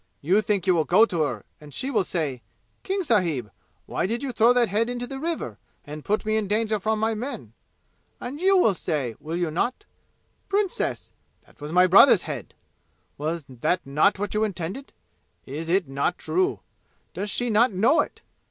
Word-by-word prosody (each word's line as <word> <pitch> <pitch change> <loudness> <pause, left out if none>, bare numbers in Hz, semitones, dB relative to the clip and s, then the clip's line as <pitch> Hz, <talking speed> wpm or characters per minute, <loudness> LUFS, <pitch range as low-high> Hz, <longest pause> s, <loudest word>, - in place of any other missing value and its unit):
You 185 +8 +2
think 205 -4 -1
you 185 - +4
will 165 -2 +2
go 190 +8 +5
to 175 -7 -2
her, 120 -9 -2
and 150 -1 -13
she 260 - -3
will 215 -6 +2
say, 150 -9 -3 0.4
'King 385 0 -2
sahib, 170 - 0 0.3
why - - -2
did 235 +5 -3
you 270 - -2
throw 235 0 +4
that 245 -1 +3
head 215 +4 0
into 245 0 -3
the 270 +2 -7
river, 330 +3 -3 0.3
and 150 +1 -8
put 210 +2 -1
me 215 0 +1
in 215 -2 -1
danger 215 +1 0
from 220 +2 0
my 220 +1 +1
men?' 245 +6 -6 0.7
And 275 +6 -6
you 385 +1 +5
will 225 - +4
say, 140 -8 -2
will 160 +2 -4
you 175 -3 -1
not, 250 - -2 0.6
'Princess, 400 -1 -1 0.3
that - - -24
was 150 +1 -6
my 180 +2 +5
brother's 190 +2 +7
head!'? 140 -8 -7 0.6
Was 155 +1 -3
that 135 +8 -1
not 150 +9 +2
what 205 0 -3
you 215 +1 +1
intended? 200 +6 -4 0.5
Is 155 +5 -6
it 185 -2 +2
not 140 +6 -1
true? 370 +1 0 0.5
Does 205 +2 -4
she 245 +3 -1
not 225 +3 +4
know 210 - +3
it? - - -2
200 Hz, 190 wpm, -25 LUFS, 160-240 Hz, 0.7 s, brother's